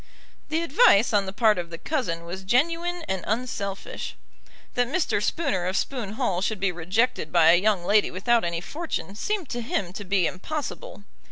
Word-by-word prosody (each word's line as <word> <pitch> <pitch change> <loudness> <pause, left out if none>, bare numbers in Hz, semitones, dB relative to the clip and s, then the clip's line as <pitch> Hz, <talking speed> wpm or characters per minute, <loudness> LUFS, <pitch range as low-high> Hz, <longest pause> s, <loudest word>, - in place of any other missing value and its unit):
The 320 +2 0
advice 285 - +5
on 200 -2 +2
the - - -3
part 215 -1 +3
of 170 -1 -5
the 165 - -7
cousin 170 - -2
was 180 +3 -6
genuine 335 - +1
and 190 -2 -2
unselfish. 205 -4 -3 0.6
That 245 0 +1
Mr. 315 +6 0
Spooner 190 - 0
of 190 +2 0
Spoon 235 -7 -2
Hall 205 -7 -1
should 210 +1 -1
be 195 -1 +1
rejected 180 +1 0
by 165 -2 +6
a 175 +1 +4
young 200 -4 +1
lady 210 +2 +4
without 230 +5 +1
any 170 -1 -2
fortune 300 - -4
seemed 375 - -2
to 240 - -3
him 195 -6 -2
to 205 - -6
be 190 -2 +1
impossible. 305 - -5
205 Hz, 180 wpm, -25 LUFS, 185-260 Hz, 0.6 s, by